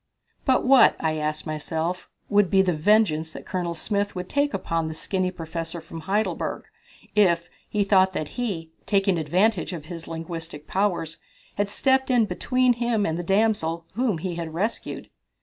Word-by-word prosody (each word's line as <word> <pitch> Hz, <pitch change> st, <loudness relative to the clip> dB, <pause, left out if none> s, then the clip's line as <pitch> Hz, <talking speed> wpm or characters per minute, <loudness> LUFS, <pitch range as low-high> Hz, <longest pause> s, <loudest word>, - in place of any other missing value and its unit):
"But 260 Hz, -2 st, +3 dB
what," 265 Hz, 0 st, +7 dB
I 155 Hz, -1 st, 0 dB
asked 155 Hz, 0 st, -2 dB
myself, 160 Hz, +3 st, -3 dB, 0.2 s
"would 205 Hz, -3 st, +3 dB
be 190 Hz, +1 st, +5 dB
the 180 Hz, -2 st, +1 dB
vengeance 160 Hz, -2 st, +3 dB
that -, -, -9 dB
Colonel 175 Hz, -2 st, -2 dB
Smith 205 Hz, +4 st, -1 dB
would 180 Hz, 0 st, -5 dB
take 285 Hz, 0 st, +1 dB
upon 165 Hz, -8 st, -1 dB
this 160 Hz, 0 st, -5 dB
skinny 185 Hz, +2 st, -1 dB
professor 165 Hz, -1 st, -5 dB
from 165 Hz, 0 st, -9 dB
Heidelberg 200 Hz, +6 st, -1 dB, 0.5 s
if 175 Hz, -5 st, +3 dB, 0.2 s
he 210 Hz, -1 st, +1 dB
thought 190 Hz, -1 st, +4 dB
that 150 Hz, -, -3 dB
he, 190 Hz, -10 st, -4 dB, 0.2 s
taking 195 Hz, -3 st, +2 dB
advantage 185 Hz, +5 st, +1 dB
of 160 Hz, -3 st, -6 dB
his 165 Hz, 0 st, -8 dB
linguistic 165 Hz, -2 st, -6 dB
powers, 185 Hz, -5 st, -1 dB, 0.3 s
had 205 Hz, 0 st, -1 dB
stepped 265 Hz, +5 st, +2 dB
in 245 Hz, -3 st, +4 dB
between 255 Hz, +3 st, +2 dB
him 235 Hz, -3 st, 0 dB
and 160 Hz, -, -1 dB
the 175 Hz, -, -2 dB
damsel 185 Hz, -4 st, +1 dB
whom 230 Hz, -4 st, 0 dB
he 175 Hz, +1 st, -4 dB
had 165 Hz, -2 st, -5 dB
rescued?" 210 Hz, +7 st, -3 dB
180 Hz, 165 wpm, -25 LUFS, 165-210 Hz, 0.5 s, what